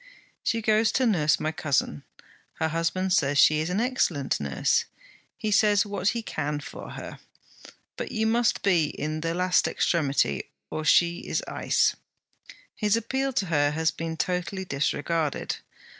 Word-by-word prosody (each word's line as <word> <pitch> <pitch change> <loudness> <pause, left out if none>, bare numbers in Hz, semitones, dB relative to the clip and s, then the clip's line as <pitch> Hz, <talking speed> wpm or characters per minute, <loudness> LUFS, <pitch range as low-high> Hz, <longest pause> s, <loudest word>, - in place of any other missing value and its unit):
She 230 -1 -1
goes 220 +1 +3
to 260 - +2
nurse 165 -10 +2
my 155 - -1
cousin. 135 - -1 0.5
Her 160 - -1
husband 175 +3 0
says 145 -5 +2
she 150 +2 +6
is 160 +2 -1
an 180 +3 0
excellent 225 - 0
nurse. 70 -2 +1 0.5
He 215 - -2
says 205 0 +4
what 200 -2 -3
he 230 +2 +1
can 150 -6 -3
for 145 - -9
her. - - -8 0.8
But - - -5
you 220 -1 0
must 230 +1 +1
be 175 -5 +3
in 155 +1 -4
the 165 +1 -2
last 180 0 +2
extremity, 140 - 0 0.2
or 155 - -3
she 170 +3 +4
is - - -1
ice. - - +1 0.8
His 210 0 +1
appeal 265 +4 -1
to 200 - 0
her 145 -1 +3
has 160 +1 +1
been 165 0 -5
totally 180 +3 -2
disregarded. 150 +1 -1
170 Hz, 155 wpm, -26 LUFS, 150-210 Hz, 0.8 s, she